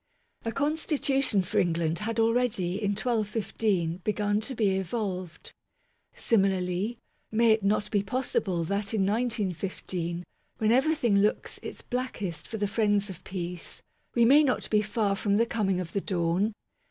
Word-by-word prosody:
A 230 - 0
Constitution 275 - +1
for 175 - 0
England 165 -1 +1
had 230 +1 -2
already 225 -5 +2
in 205 -1 +1
1215 210 -6 0
begun 205 +2 0
to 260 +4 -4
be 215 -4 +2
evolved. 190 -2 -4 0.6
Similarly, 195 +1 +1 0.3
may 225 +1 +4
it 220 0 +3
not 210 +1 +1
be 205 - +2
poss 250 +6 -2
ible 175 -5 0
that 200 +4 -1
in 195 -3 +2
1915, 190 -5 -2 0.3
when 220 0 +2
everything 250 -5 +3
looks 210 +1 0
its - - -8
blackest 205 - -4
for 220 - -5
the 205 -1 0
friends 205 -1 +1
of 180 0 -11
peace, 180 -2 -6 0.3
we 235 -1 +5
may 285 +6 +7
not 265 -4 0
be 210 -1 +4
far 210 -1 0
from 200 0 +1
the 230 - +4
coming 200 -5 0
of 170 -2 -5
the 200 - 0
dawn? 185 +4 0
205 Hz, 155 wpm, -28 LUFS, 185-230 Hz, 0.6 s, may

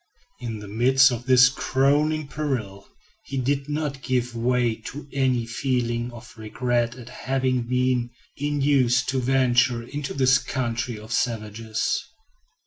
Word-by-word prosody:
In 115 -2 -5
the 105 -1 -9
midst 130 +6 +4
of 120 +1 -5
this 125 -1 +7
crowning 145 +3 +1
peril 120 -11 -4 0.4
he 135 - -6
did 135 +2 -1
not 145 -2 -3
give 125 -2 -1
way 120 0 +1
to 145 +1 -8
any 130 -3 +1
feeling 120 0 -1
of 120 -2 -12
regret 120 +2 -1
at 120 -2 -11
having 130 -1 -1
been 125 -1 +1 0.3
induced 140 -4 +2
to 130 0 0
venture 125 -2 +2
into 145 +3 -5
this 130 -1 +4
country 120 -2 -3
of 110 +2 -11
savages. 110 -1 -1
125 Hz, 135 wpm, -24 LUFS, 120-135 Hz, 0.4 s, this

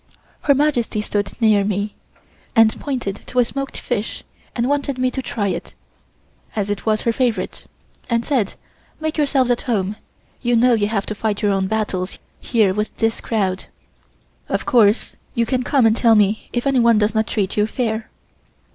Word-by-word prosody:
Her 280 - +5
Majesty 265 -7 +1
stood 205 +1 -2
near 215 -3 +4
me, 205 +1 -1 0.6
and 225 -1 +5
pointed 245 -8 -3
to 250 - -7
a 245 - +5
smoked 275 +2 -4
fish 230 -3 -3 0.3
and 235 0 0
wanted 280 -1 0
me 255 0 +1
to 265 - -3
try 205 -5 -2
it, - - -5 0.8
as 205 -1 -1
it 205 +2 -4
was 215 -1 +2
her 230 - +1
favorite, 230 -7 -1 0.4
and 235 -1 +1
said: 245 -9 0 0.4
"Make 315 0 -2
yourselves 270 -4 +2
at 240 - +1
home. 205 -3 0 0.5
You 240 -1 +2
know 245 +2 +5
you 210 -3 +2
have 205 -2 -1
to - - -3
fight 210 0 -2
your 205 - +3
own 195 -1 +1
battles 200 -3 -2 0.2
here 215 -6 +2
with 210 +2 -3
this 225 0 0
crowd. 195 -4 -1 0.8
Of - - -1
course 220 -2 +3 0.2
you 235 - +2
can 255 +2 0
come 255 -1 +2
and 220 0 +4
tell 230 -1 +4
me 210 +1 +2
if 240 +1 -2
anyone 235 -5 +4
does 210 +1 +2
not 220 0 +1
treat 200 -3 -1
you 210 0 +2
fair." 225 -2 -2
225 Hz, 180 wpm, -20 LUFS, 210-250 Hz, 0.8 s, Her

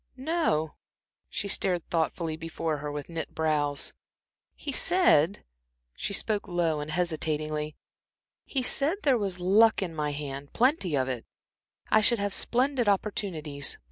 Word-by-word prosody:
"No." 260 - 0 0.6
She 200 - -3
stared 180 -3 0
thoughtfully 165 0 0
before 165 -1 -3
her 145 0 -5
with 145 -1 -5
knit 165 -2 -5
brows. 150 -2 0 0.6
"He 285 - -5
said" 260 - +3 0.5
she - - -4
spoke 210 +1 +1
low 170 -4 0
and 150 +1 -5
hesitatingly 155 -2 -1 0.7
"he 265 -2 -2
said 285 +8 +2
there 275 -3 +4
was 195 -3 -2
luck 205 +4 +5
in 175 -3 -4
my 150 -2 -1
hand 140 -1 -6
plenty 235 - +2
of 130 -1 +1
it; 125 -3 -3 0.7
I 215 - +6
should 235 +3 +4
have 200 -1 -1
splendid 250 -2 +1
opportunities. 165 -8 -1
170 Hz, 140 wpm, -28 LUFS, 150-215 Hz, 0.7 s, I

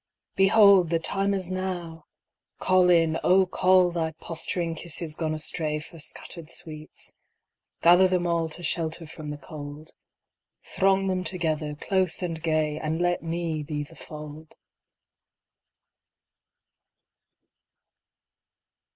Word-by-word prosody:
Behold, 195 -2 +6
The 165 - +2
time 195 +4 -1
is 185 -2 -2
now! 175 -4 -4 0.5
Call 185 -1 +4
in, 165 -2 +4
O 190 +1 +5
call 185 0 +4
Thy 165 -2 -2
posturing 165 +1 -3
kisses 165 -1 -3
gone 155 -1 -2
astray 155 0 -2
For 160 +2 -10
scattered 160 +1 -7
sweets. 155 -2 -7 0.7
Gather 175 +2 +7
them 180 -1 0
all 170 -1 0
To 175 +3 -8
shelter 165 0 -1
from 155 -1 -8
the 150 - -5
cold. 145 +1 -9 0.7
Throng 195 0 +2
them 185 -1 0
together, 155 -4 -2
close 185 +2 0
and 165 -2 -3
gay, 155 -2 0
And 160 +1 -2
let 175 0 +1
me 165 -1 -2
be 150 0 -3
the 165 +3 -14
fold! 150 0 -10
165 Hz, 115 wpm, -26 LUFS, 155-180 Hz, 0.7 s, Gather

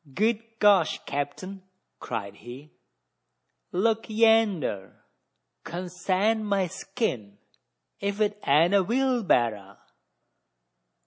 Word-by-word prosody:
"Good 220 +2 +1 0.2
gosh, 205 -6 +4
capt'n!" 185 +7 -5 0.4
cried 100 -4 -5
he, 125 +7 -11 1.0
"look 225 +5 0
yander! 215 - +1 0.6
Consarn 185 +5 -1
my 200 -2 +1
skin! 120 - -4 0.6
ef 200 0 -2
't 210 -1 +2
ain't 160 +7 +4
a 200 -1 +4
wheelberra!" 180 - 0
185 Hz, 80 wpm, -26 LUFS, 140-215 Hz, 1.0 s, gosh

